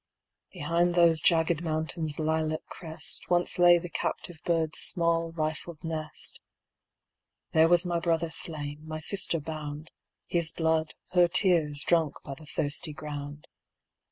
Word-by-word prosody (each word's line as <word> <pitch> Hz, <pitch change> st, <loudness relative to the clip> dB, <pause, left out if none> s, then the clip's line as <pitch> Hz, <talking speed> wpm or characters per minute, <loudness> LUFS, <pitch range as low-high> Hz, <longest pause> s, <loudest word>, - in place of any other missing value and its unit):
Behind 170 Hz, +4 st, 0 dB
those 170 Hz, -2 st, +5 dB
jagged 165 Hz, 0 st, +3 dB
Mountains' 155 Hz, -1 st, -2 dB
lilac 155 Hz, 0 st, -1 dB
crest 160 Hz, -2 st, -3 dB
Once 175 Hz, 0 st, +1 dB
lay 175 Hz, 0 st, +7 dB
the 175 Hz, +1 st, -5 dB
captive 170 Hz, -1 st, -3 dB
bird's 165 Hz, -2 st, 0 dB
small 165 Hz, -1 st, +1 dB
rifled 155 Hz, 0 st, -4 dB
nest. 155 Hz, -2 st, -3 dB, 1.1 s
There 160 Hz, 0 st, +5 dB
was 175 Hz, +1 st, +4 dB
my 175 Hz, -1 st, 0 dB
brother 165 Hz, -1 st, 0 dB
slain, 145 Hz, -2 st, -3 dB
my 155 Hz, 0 st, -5 dB
sister 170 Hz, 0 st, +1 dB
bound; 150 Hz, 0 st, -7 dB, 0.3 s
His 170 Hz, -2 st, +1 dB
blood, 160 Hz, -1 st, 0 dB, 0.2 s
her 180 Hz, -1 st, +5 dB
tears, 170 Hz, -5 st, +2 dB
drunk 165 Hz, -4 st, +2 dB
by 135 Hz, -, -5 dB
the 150 Hz, +3 st, -13 dB
thirsty 150 Hz, +1 st, -1 dB
ground. 145 Hz, -1 st, -7 dB
160 Hz, 130 wpm, -28 LUFS, 155-170 Hz, 1.1 s, lay